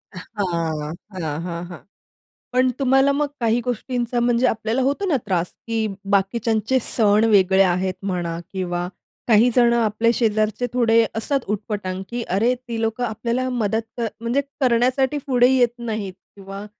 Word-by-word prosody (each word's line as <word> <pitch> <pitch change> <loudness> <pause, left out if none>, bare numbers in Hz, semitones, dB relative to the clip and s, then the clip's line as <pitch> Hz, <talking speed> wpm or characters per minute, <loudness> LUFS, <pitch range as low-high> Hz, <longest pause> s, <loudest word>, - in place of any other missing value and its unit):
हां, 170 -6 -3 0.3
हां, 155 0 -3
हां, 170 0 -4
हां. 175 - -9 0.7
पण 255 0 +3
तुम्हाला 270 +1 +4
मग 295 +1 0
काही 230 0 +2
गोष्टींचा 245 0 -2
म्हणजे 240 +1 +2
आपल्याला 225 +3 0
होतो 285 +10 0
ना 310 -7 +2
त्रास 180 -3 -1 0.2
की 225 -1 0 0.3
बाकीच्यांचे 220 +5 +1
सण 215 -1 +2
वेगळे 190 -1 +5
आहेत 185 +1 +1
म्हणा 175 -3 -2
किंवा 175 -1 -2 0.4
काही 230 +2 +5
जण 240 -1 +5
आपल्या 230 0 +2
शेजारचे 215 +1 0
थोडे 230 -2 +4
असतात 275 +5 0 0.2
उटपटांग 200 -3 -5
की 240 0 -3
अरे 230 +5 +3
ती 240 -2 -6
लोकं 225 +2 -1
आपल्याला 240 +3 -2
मदत 225 -2 0 0.2
कर, 230 +2 -2 0.2
करण्यासाठी 255 +3 +2
पुढे 245 -2 +4
येत 245 -3 +3
नाहीत 215 -5 -4 0.2
किंवा 195 0 -8
225 Hz, 145 wpm, -22 LUFS, 195-245 Hz, 0.7 s, वेगळे